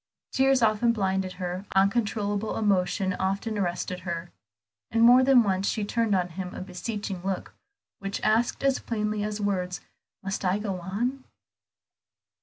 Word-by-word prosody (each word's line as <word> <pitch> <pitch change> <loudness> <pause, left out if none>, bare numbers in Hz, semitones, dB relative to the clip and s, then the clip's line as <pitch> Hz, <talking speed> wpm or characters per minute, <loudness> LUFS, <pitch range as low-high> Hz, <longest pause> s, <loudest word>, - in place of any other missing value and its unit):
Tears 270 -1 +3
often 225 +2 +3
blinded 190 -3 -1
her, 180 +1 -5
uncontrollable 205 +1 +1
emotion 190 -2 +1
often 195 +4 -1
arrested 180 -1 -2
her; 170 -1 -5 0.6
and 230 0 +2
more 245 +2 +8
than 260 -2 +6
once 195 -1 0
she 215 -2 0
turned 225 -1 +1
on 180 -1 0
him 180 +1 -6
a - - -5
beseeching 195 +1 -5
look, 190 -1 -3 0.5
which 195 0 -4
asked 220 +5 +1
as 275 -1 +3
plainly 210 -2 -2
as 210 0 -3
words, 185 -4 -1 0.4
"Must 195 0 -3
I 185 +1 +2
go 200 -3 -3
on?" 240 +9 -2
200 Hz, 145 wpm, -27 LUFS, 185-220 Hz, 0.6 s, more